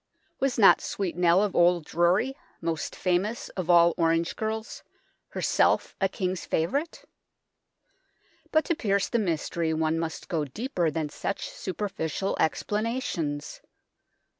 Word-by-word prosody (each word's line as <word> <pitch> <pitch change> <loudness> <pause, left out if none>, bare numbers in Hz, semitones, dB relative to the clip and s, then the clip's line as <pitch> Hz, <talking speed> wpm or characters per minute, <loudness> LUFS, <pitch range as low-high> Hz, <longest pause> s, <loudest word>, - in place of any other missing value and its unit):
Was 270 -2 0
not 205 -4 +7
Sweet 190 -4 -3
Nell 175 +2 +4
of 205 - -2
Old 175 -2 +4
Drury, 180 - +2 0.2
most 165 -1 -3
famous 190 +5 -1
of 180 -2 -5
all 170 -1 +6
orange 165 0 +1
girls, 220 +1 -4 0.5
herself - - +1
a 195 - +3
King's 185 -2 -3
favourite? 280 - -2 1.5
But 315 0 +3
to 335 - 0
pierce 200 -7 0
the 235 - +1
mystery 165 -3 -1
one 160 +1 0
must 165 -1 -4
go 160 -3 -1
deeper 175 - -2
than 155 0 -2
such 200 +6 -4
super 195 +2 -4
ficial 190 +1 -2
explanations. 170 - -2
180 Hz, 130 wpm, -27 LUFS, 165-210 Hz, 1.5 s, not